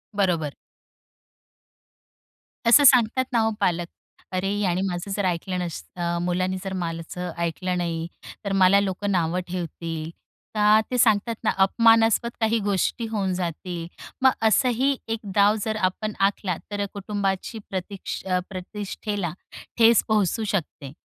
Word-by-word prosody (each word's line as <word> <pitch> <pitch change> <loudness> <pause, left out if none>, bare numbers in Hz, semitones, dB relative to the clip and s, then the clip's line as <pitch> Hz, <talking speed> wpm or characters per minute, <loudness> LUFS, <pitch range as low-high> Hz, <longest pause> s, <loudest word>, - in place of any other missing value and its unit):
बरोबर. 170 -7 +1 2.1
असं 265 +5 +8
सांगतात 255 -1 +5
ना 235 - +4
हो 225 0 +2
पालक. 175 -1 0 0.4
अरे, 185 +1 -1
यानी 185 -3 +1
माझं 180 +2 -4
जर 200 0 -1
ऐकलं 180 +1 -1
नसतं 170 0 -4
मुलांनी 185 +1 0
जर 195 -1 -4
माझं 165 0 -6 0.2
ऐकलं 180 +2 -2
नाही 165 -2 -2 0.4
तर 200 - -2
मला 190 +2 +6
लोकं 200 +1 -2
नावं 175 -1 +1
ठेवतील. 165 -2 -5 0.5
का 210 0 +5
ते 250 - 0
सांगतात 225 -1 +3
ना - - +2
अपमानास्पद 225 +2 +4
काही 225 0 +2
गोष्टी 205 +3 0
होऊन 200 -4 -1
जातील. 175 -1 -4 0.3
मग 260 0 +6 0.2
असंही 255 +4 +2
एक 225 0 -2 0.2
डाव 205 +1 +5
जर 220 -1 -1
आपण 215 +3 -5 0.2
आखला 190 -3 -4 0.2
तर 205 0 -1
कुटुंबाची 200 +1 -3
प्रतिक्ष 190 +1 -5 0.3
प्रतिष्ठेला 195 0 -4 0.5
ठेच 230 -1 +6
पोहोचू 215 0 +1
शकते. 150 -7 -3
195 Hz, 130 wpm, -24 LUFS, 175-220 Hz, 2.1 s, असं